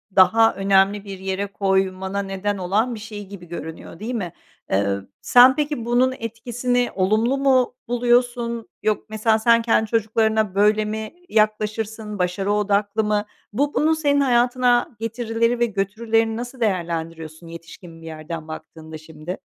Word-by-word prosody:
daha 225 +5 +5
önemli 195 +1 +2
bir 195 -1 -7
yere 190 +1 -2
koymana 190 0 -1
neden 195 +1 -3
olan 210 +7 0
bir - - -8
şey 210 -1 -8
gibi 190 -3 -10
görünüyor, 165 0 -8
değil 230 +4 -4
mi? 180 -7 -4 0.4
Iıı, 100 0 0
sen 250 +2 +7
peki 295 -6 -2
bunun 250 +2 +2
etkisini 245 +2 -1
olumlu 215 +7 +2
mu 260 -3 +2
buluyorsun? 240 -1 +1
Yok 215 -1 0
Mesela 220 0 +1
sen 230 +1 +4
kendi 225 -1 +1
çocuklarına 220 -2 +1
böyle 210 +1 +3
mi 215 0 -5 0.2
yaklaşırsın? 215 0 -1
Başarı 185 +3 -1
odaklı 210 +1 +1
mı? 210 0 0 0.3
Bu 285 +5 0
bunun 315 +1 +3
senin 285 -2 +2
hayatına 245 -1 +2
getirileri 230 +1 -1
ve 240 - +4
götürülerini 225 +2 0
nasıl 245 +1 -7
değerlendiriyorsun 165 -5 -3
yetişkin 165 0 -11
bir 165 - -12
yerden 160 0 -7
baktığında 160 0 -9
şimdi? 155 +3 -8
215 Hz, 140 wpm, -22 LUFS, 190-235 Hz, 0.4 s, sen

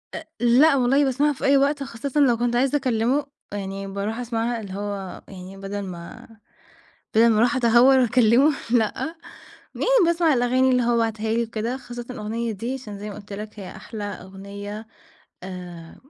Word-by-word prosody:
آآ - - -6
لأ، 260 +6 +5
والله 270 +2 +3
باسمعها 285 +2 +2
في 265 - -5
أي 275 +1 +5
وقت، 280 +1 +1
خاصةً 270 +2 -3
لو 250 -5 +4
كنت 240 +1 0
عايزة 270 +4 +2
أكلمه 255 +1 0 0.3
يعني 195 -1 -5
باروح 200 +3 -3
أسمعها، 235 -1 -2
اللي 195 -3 -8
هو 200 -2 -5
يعني 190 0 -10
بَدل 195 +1 -5
ما 175 -3 -9 0.9
بَدل 225 +2 +6
ما 215 - +2
أروح 245 +5 +3
أتهور 245 +2 +5
وأكلمه 245 +3 +4 0.2
لأ، 240 +8 0 0.6
يعني - - -2 0.2
باسمع 335 -1 +3
الأغاني 255 +1 +2
اللي 250 -1 +3
هو 240 0 +2
باعتها 220 -1 -1
لي 235 +1 +1
وكده 230 +2 -3
خاصةً 240 -2 -8
الأغنية 230 0 -3
دي. 230 +6 -4
عشان 215 -6 -8
زي 210 +1 -6
ما 200 - -8
قُلْت 205 0 -11
لَك 210 +1 -7
هي 190 - -7
أحلى 215 -3 -7
أغنية 200 +2 -8 0.6
آآ 180 -3 -9
230 Hz, 170 wpm, -23 LUFS, 205-255 Hz, 0.9 s, بَدل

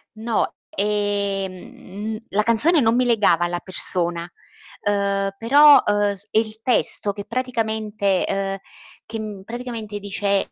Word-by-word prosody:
No, 225 0 -1 0.2
ehm, 200 0 -3
la 210 +2 +1
canzone 280 +8 +4
non 225 0 +3
mi 250 0 +2
legava 205 -7 +3
alla 175 0 -2
persona, 175 -2 -1 0.5
ehm, 200 -1 0
però, 285 +5 +7
ehm, 205 -1 +2
è - - -1
il 220 0 -1
testo 210 -4 +1
che 205 - -7
praticamente 220 -5 -1
ehm, 195 0 -2 0.5
che 215 -3 -6
praticamente 230 -3 -6
dice 200 0 -1
205 Hz, 120 wpm, -22 LUFS, 195-225 Hz, 0.5 s, però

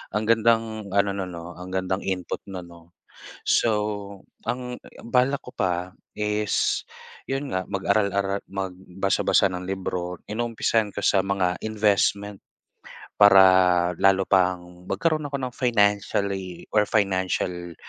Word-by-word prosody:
ang 105 0 -1
gandang 115 -2 +2
ano 100 +1 +2
non, 95 -2 -4
'no, 85 +1 -8
ang 90 +1 -8
gandang 95 +1 -1
input 95 -2 -3
no'n, 95 -2 -7
no? 85 0 -17 0.5
So 105 -3 0 0.3
ang, 125 0 -3
eh, - - -17
ang 115 - -11
balak 130 +2 +2
ko 125 - -10
pa 90 -1 -1 0.2
is 105 0 0 0.4
'yon 135 +1 -3
nga, 95 0 -1
mag-aral-ara 100 0 0
magbasa-basa 95 0 0
ng 90 0 -5
libro. 90 -2 -3
Inuumpisahan 115 -1 0
ko - - -3
sa 95 - +4
mga 95 -2 0
investment, 105 -2 +1 0.8
para 95 -3 +6
lalo 95 0 +4
pang 90 -1 0
magkaroon 155 -2 0
ako 140 - -2
ng 130 - -2
financially 100 -5 0
or 105 -1 +4
financial, 95 -4 -1
100 Hz, 125 wpm, -24 LUFS, 90-105 Hz, 0.8 s, para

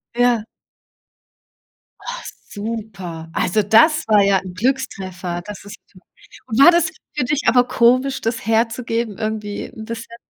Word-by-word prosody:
Ja. 240 -3 +2 1.6
Ach - - -6 0.3
super. 200 -7 -6
Also, 210 +4 +1
das 305 - +5
war 210 -2 +5
ja 200 -1 +4
'n 185 -1 -9
Glückstreffer. 185 -6 -2
Das 210 -1 -8
ist 205 +1 -10 0.7
und 225 +1 -2
war 345 +5 +9
das 340 -1 +3 0.3
für 260 - 0
dich 295 +3 -1
aber 245 +2 +4
komisch, 255 +3 +2
das 225 -2 -3
herzugeben 230 -1 0
irgendwie 215 -1 -4
'n 220 0 -9
bisschen? 230 0 -7
225 Hz, 135 wpm, -20 LUFS, 205-250 Hz, 1.6 s, war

